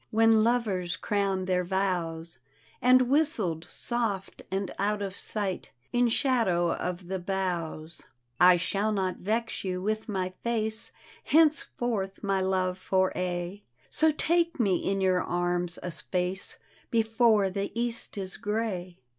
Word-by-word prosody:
When 225 0 +5
lovers 200 -8 0
crown 195 -1 0
their 180 -1 +1
vows, 170 -5 -2 0.4
And 255 +1 +6
whistled 245 - +1
soft 220 -6 -2
and 195 0 -2
out 205 +1 0
of 195 -1 -4
sight 200 -4 -3 0.2
In 245 0 +4
shadow 225 -10 +2
of 180 0 -4
the 190 +1 -2
boughs. 175 -4 -3 0.2
" 120 0 -48
I 180 0 +8
shall 200 +4 0
not 190 -3 -1
vex 225 +4 -2
you 185 -1 -2
with 215 +4 -2
my 185 -2 -2
face 220 -2 -1 0.3
Henceforth, 245 -10 +2
my 195 -1 +1
love, 185 -1 0
for 190 0 +1
aye; 180 +2 -3 0.3
So 315 0 +4
take 335 +1 +1
me 195 -6 +3
in 195 0 -1
your 185 -1 +3
arms 175 0 -1
a 180 - -3
space 180 +2 -2 0.3
Befoie 225 -4 +3
the 200 0 -2
east 235 -2 -2
is 190 -1 -4
gray. 200 -5 -3
195 Hz, 140 wpm, -28 LUFS, 180-225 Hz, 0.4 s, I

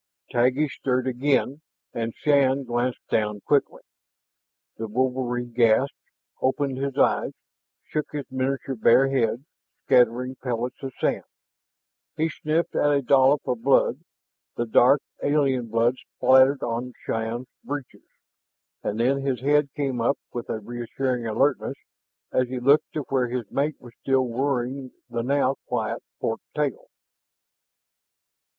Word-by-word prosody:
Taggi 130 +5 +2
stirred 130 -2 -1
again, 135 +2 0 0.3
and 115 -1 -3
Shann 140 -2 +3
glanced 120 0 -2
down 105 -1 0
quickly. 145 +4 0 0.9
The 115 - -4
wolverine 125 +1 -1
gasped, 120 +3 +3 0.5
opened 135 0 0
his 140 0 -3
eyes, - - +2 0.5
shook 150 - -3
his 145 -2 -4
miniature 135 +1 -2
bear 130 +3 +4
head, 125 -1 0 0.4
scattering 125 +2 +3
pellets 125 +1 -3
of 135 -2 -5
sand. - - 0 0.9
He 160 +1 +1
sniffed 160 +2 -1
at 145 - +3
a 140 -1 +2
dollop 135 +2 +4
of 125 -2 -1
blood, 135 +3 +3 0.6
the 120 - -1
dark, 125 +5 +5 0.2
alien 135 -4 +1
blood, 115 +3 +2 0.2
spattered 130 +1 +5
on 120 +2 -3
Shann's 115 +2 -2 0.2
breeches, 145 -2 -7 0.7
and 105 +2 -3
then 135 +4 +2
his 135 -2 -1
head 145 +1 +3
came 135 -4 -1
up 125 +4 +2 0.2
with 120 - -5
a - - -1
reassuring 120 +2 -3
alertness 135 +6 +1 0.6
as 130 - +2
he 125 0 -4
looked 140 +5 +3
to 155 - -2
where 130 -2 +1
his 120 -4 -4
mate 145 +1 -1
was 120 -1 -14
still 135 -1 +2
worrying 130 +1 -2 0.2
the 120 0 -1
now 135 +1 +1
quiet - - -2 0.2
fork 115 - -2
tail. 150 -3 -2
130 Hz, 130 wpm, -25 LUFS, 120-140 Hz, 0.9 s, dark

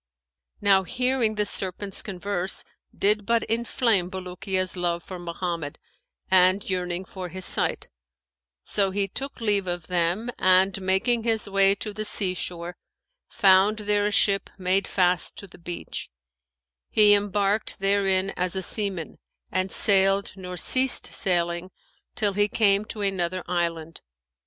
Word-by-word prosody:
Now 200 -2 +4
hearing 250 +3 0
the 210 0 0
serpents' 195 0 0
converse 190 -1 -2 0.3
did 210 +1 +1
but 230 +2 +1
inflame 225 -4 0
Bulukiya's 185 0 -2
love 170 -1 -2
for 185 -2 -9
Mohammed 170 -3 -5 0.5
and 185 +1 +4
yearning 180 -1 -2
for 185 -1 -8
his 185 +1 -6
sight; - - +2 0.8
so 200 -2 +1
he 195 +1 -1
took 275 +8 -4
leave 205 -4 0
of 175 -1 -4
them; 180 +6 -1
and, 190 +1 +3
making 200 +6 +1
his 225 -2 0
way 195 0 +3
to 210 +1 -6
the 215 +1 -4
sea 195 -3 0
shore, 175 -1 -5 0.5
found 200 0 +4
there 205 -1 0
a - - -2
ship 200 -1 +2
made 190 +1 0
fast 180 -1 0
to - - -9
the 185 - -16
beach; 175 0 -7 0.8
he 210 -1 +5
embarked 205 +1 0
therein 195 -1 +1
as 180 +1 -2
a 190 - -2
seaman 195 -7 0 0.3
and 185 +1 -1
sailed 195 0 +4
nor 180 -2 -8
ceased 260 +7 +3
sailing 175 -1 0 0.5
till 205 -3 0
he 205 +1 +2
came 205 -1 +2
to 215 -1 -7
another 185 -2 -2
island. 165 -2 -3
195 Hz, 140 wpm, -24 LUFS, 180-205 Hz, 0.8 s, he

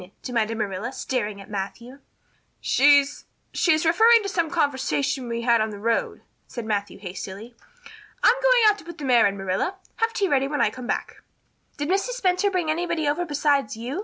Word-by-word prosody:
demanded 225 -2 -1
Marilla, 210 +2 -3
staring 235 -6 -3
at 195 - -11
Matthew. 235 +6 -6 0.6
"She 285 +1 +5
she's 285 - -11 0.3
just 315 -2 +2
referring 445 +7 +5
to 395 - -3
some 335 -4 -1
conversation 280 -4 -1
we 235 0 -3
had 235 -2 +3
on 220 - 0
the 210 - -8
road," 230 +3 -1 0.3
said 235 -3 -7
Matthew 205 -3 -2
hastily. 195 +4 -8 0.7
"I'm 465 - +7
going - - +4
out 415 -1 +3
to - - -13
put 340 0 -10
the 290 - -6
mare 245 -4 +5
in, 200 0 -3
Marilla. 195 - -2 0.2
Have 455 0 +1
tea 400 - 0
ready 275 -4 +1
when 295 +1 -3
I - - +2
come 250 -2 -8
back." - - -3 0.6
"Did 290 0 -3
Mrs. 390 +8 0
Spencer 370 +2 +2
bring 355 -5 -1
anybody 335 -1 -1
over 320 +5 0
besides 285 -6 0
you?" 240 +4 -5
275 Hz, 190 wpm, -24 LUFS, 225-340 Hz, 0.7 s, I'm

